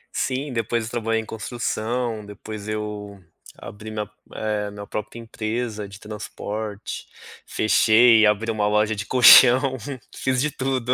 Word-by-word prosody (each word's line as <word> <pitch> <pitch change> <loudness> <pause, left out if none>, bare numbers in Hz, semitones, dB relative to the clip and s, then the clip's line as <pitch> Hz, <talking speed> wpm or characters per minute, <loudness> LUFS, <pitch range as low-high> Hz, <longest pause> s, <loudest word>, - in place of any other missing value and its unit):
Sim, 135 +1 -2
depois 115 0 -1
eu 110 - -7
trabalhei 115 -1 -1
em - - -11
construção. 115 0 -3
Depois 105 +1 -9
eu 105 -2 -5 0.4
abri 105 +2 -10
minha 105 -1 -4 0.3
eh 105 -1 -2
minha 100 0 -8
própria 105 +3 -6
empresa 110 -1 -4
de 100 +1 -12
transporte. 105 0 -6 0.4
Fechei 110 +1 +5
e - - +6
abri 105 +2 +1
uma 105 -2 0
loja 105 +1 +1
de 105 0 -5
colchão. 130 +1 +7 0.4
Fiz 130 -1 -1
de 150 +3 0
tudo. 130 -2 -1
110 Hz, 145 wpm, -23 LUFS, 105-120 Hz, 0.4 s, colchão